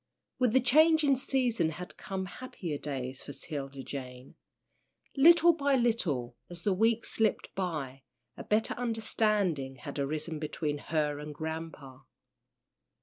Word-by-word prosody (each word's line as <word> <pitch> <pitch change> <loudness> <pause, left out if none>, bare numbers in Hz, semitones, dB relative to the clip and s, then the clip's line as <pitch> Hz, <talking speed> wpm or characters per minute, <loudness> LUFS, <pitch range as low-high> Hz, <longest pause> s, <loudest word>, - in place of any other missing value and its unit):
With 250 -3 +3
the 260 - +6
changing 305 +2 +5
season 250 -9 +1
had 180 +3 -8
come 190 -1 -4
happier 180 - -6
days 130 -2 -4
for 145 - -8
'Tilda 140 -3 -6
Jane. 130 -2 -8 0.8
Little 335 +4 +7
by 285 -3 +1
little, 170 - 0
as 175 -1 -9
the 200 - +2
weeks 225 +4 +2
slipped 220 -1 +1
by, 150 -8 -3 0.3
a - - -8
better 215 +1 +1
understanding 215 - 0
had 140 +3 -7
arisen 155 +3 -2
between 150 -1 -3
her 150 -1 -1
and 150 0 -7
"grampa." 160 -4 -6
165 Hz, 130 wpm, -30 LUFS, 145-230 Hz, 0.8 s, Little